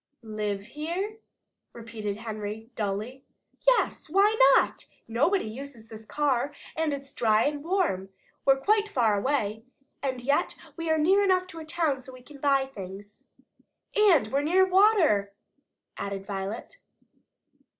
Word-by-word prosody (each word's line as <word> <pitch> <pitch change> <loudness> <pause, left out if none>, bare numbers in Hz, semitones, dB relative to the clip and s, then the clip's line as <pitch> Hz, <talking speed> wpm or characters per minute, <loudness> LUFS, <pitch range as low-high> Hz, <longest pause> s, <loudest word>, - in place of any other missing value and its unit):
"Live 210 -2 -3
here?" 345 - -4 0.5
repeated 220 -3 -5
Henry 215 +1 -6
dully. 220 +5 -4 0.4
"Yes! - - +2
Why 400 +5 +4 0.2
not?" - - +7
replied - - -18
Jess. - - -11 0.2
"Nobody 290 - +1
uses 235 0 -8
this 220 -1 -10
car, 285 -1 0 0.2
and 320 -1 0
it's 275 -1 -6
dry 220 -2 +3
and 290 0 -1
warm. 325 - 0 0.3
We're 270 0 +5
quite 425 +4 +2
far 230 - +2
away. 220 -2 -1 0.4
And 260 -2 -2
yet 280 +3 +1 0.2
we 330 -1 -4
are 315 - +3
near 380 +6 +4
enough 370 -2 +3
to 330 - -8
a 320 - -8
town 310 -4 0
so 260 +1 -12
we 255 -1 -13
can 285 +1 -14
buy 275 -1 +3
things." 200 -4 -10 0.8
"And 385 - +5
we're 275 +3 +1
near 360 +6 +4
water," 365 - +4 0.6
added 195 -1 -4
Violet. 200 - -5
270 Hz, 145 wpm, -27 LUFS, 215-330 Hz, 0.8 s, not